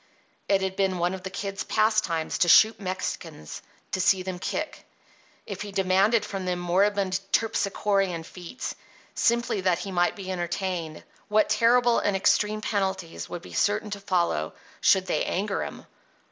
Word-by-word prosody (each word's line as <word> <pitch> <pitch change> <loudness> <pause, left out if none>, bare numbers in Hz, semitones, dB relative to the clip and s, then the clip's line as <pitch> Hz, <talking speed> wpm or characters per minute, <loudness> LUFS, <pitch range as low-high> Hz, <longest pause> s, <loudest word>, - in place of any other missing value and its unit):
It 195 -1 +3
had 190 0 -2
been 190 -2 +1
one 175 +1 0
of 190 - -6
the 190 - -5
Kid's 195 +1 -4
pastimes 215 -7 +1
to 175 - +3
shoot 220 +5 +6
Mexicans 185 - -5 0.3
"to 185 - 0
see 190 0 +3
them 185 -1 -5
kick": - - -4 0.6
if 200 -2 -6
he 205 -1 -6
demanded 195 +3 +2
from 195 -2 -5
them 180 -1 -1
moribund 190 +2 +1
Terpsichorean 200 -5 0
feats, 180 +8 -7 0.4
simply 235 -4 +1
that 185 -2 +2
he 195 - -6
might 175 -1 +1
be 190 -2 -6
entertained, 175 -2 -3 0.2
what 215 0 +3
terrible 240 0 +4
and 200 -1 +1
extreme 210 +2 +2
penalties 190 -5 -2
would 175 - -6
be - - -11
certain 210 +1 0
to 200 - -4
follow 175 - 0 0.3
should 190 -1 +4
they 180 - 0
anger 200 +2 -1
him! - - -8
190 Hz, 160 wpm, -26 LUFS, 180-205 Hz, 0.6 s, shoot